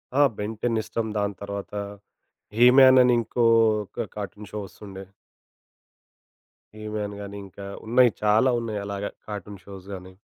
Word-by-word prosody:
ఆ! 145 - +4
'బెన్‌ 105 +2 -4
10' 115 -2 +1
ఇష్టం 110 +1 -3
దాని 100 0 -1
తరవాతా 100 0 -5 0.8
'హీ‌-మ్యాన్' 130 +1 +7
అనింకోక 115 -3 +2
కార్టూన్ 105 0 -7
షో 105 - -4
వస్తుండే. 95 +1 -11 1.7
'హీ‌‌‌‌‌-మ్యాన్' 105 -1 -5
గానీ 100 0 -8
ఇంకా 100 +1 -11 0.2
ఉన్నాయి 120 0 +5
చాలా 110 +5 +4
ఉన్నాయి 110 -3 -4
అలాగ 100 0 -4 0.2
కార్టూన్ 100 -2 -7
షోస్‌‌‌ 100 -1 -11
గాని. 95 0 -9
105 Hz, 125 wpm, -25 LUFS, 100-115 Hz, 1.7 s, హీ‌-మ్యాన్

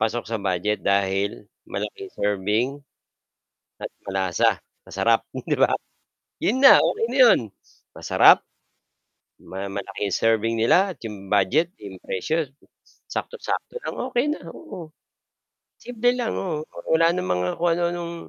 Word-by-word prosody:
Pasok 115 +2 -1
sa 115 -3 -4
budget 95 +2 -1
dahil 100 +1 0 0.2
malaking 400 -3 -5
serving 105 +3 +1 1.2
at - - -4 0.2
malasa, 95 -2 +1 0.2
masarap - - +1
'di - - -2
ba? - - +3 0.7
'Yun 225 - +1
na, 270 - +10
okey - - +1
na 260 - -2
'yun. 245 -3 +7 0.5
Masarap, - - +5 1.0
ma 95 +1 -7
malaki 100 +1 -5
'yung 100 - -1
serving 115 0 +2
nila 185 - +4
at - - -20
'yung 105 -4 -8
budget, 130 - +2
'yung 100 -3 -9
presyo 155 - -1
m 140 0 -24 0.4
saktong-sakto 485 0 -4
lang, - - -5 0.2
okey 245 +1 +2
na, 300 - -2
oo. 175 - -10 0.9
Simple 245 0 0
lang, 245 -2 -2
oo, 160 -5 -3 0.3
wala 165 +1 +4
ng 175 - -2
mga 90 0 0
kung 170 +1 +2
ano-anong 170 0 -2
115 Hz, 135 wpm, -23 LUFS, -, 1.2 s, na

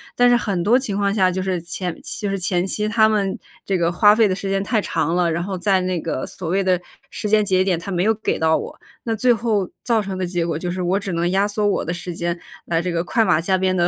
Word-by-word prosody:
但 245 0 +5
是 245 - +5
很 195 -7 -2
多 230 +7 +4
情 225 -7 -3
况 200 -1 +1
下 190 -3 +3
就 185 - -2
是 185 -1 -1
前 175 0 -4 0.3
就 205 - -1
是 195 - -1
前 180 -1 0
期 210 +2 -1
他 220 0 +4
们， 200 -3 0 0.3
这 195 - 0
个 170 -1 +1
花 205 +4 +5
费 225 -1 +4
的 185 - 0
时 195 +1 -5
间 195 0 0
太 220 +2 +1
长 165 -2 -1
了， 175 -2 +2
然 170 +1 -1
后 190 0 -4
在 190 +1 +2
那 180 -1 -1
个 130 - -3
所 180 - -7
谓 195 +3 +1
的 185 -2 +2 0.3
时 215 - -4
间 215 0 +4
节 185 -2 +2
点， 185 -3 0
他 170 - -8
没 180 -1 0
有 220 +2 +3
给 220 - -2
到 160 0 +3
我。 - - -7 0.2
那 225 -1 -1
最 245 +3 +3
后 220 -4 0 0.2
造 230 -2 +2
成 195 -2 -4
的 185 - 0
结 175 -1 -1
果 165 -2 -2
就 180 - -3
是 180 +1 -4
我 185 +3 +1
只 200 -2 -5
能 170 +1 0
压 195 +2 +2
缩 210 0 -1
我 205 - 0
的 - - -3
时 175 0 -5
间， 170 +1 -3 0.3
来 165 -1 0
这 180 - -2
个 170 0 -1
快 225 +4 +1
马 165 -4 +3
加 190 +2 +1
鞭 185 0 +1
地 175 -1 +2
190 Hz, 305 characters per minute, -21 LUFS, 175-205 Hz, 0.3 s, 但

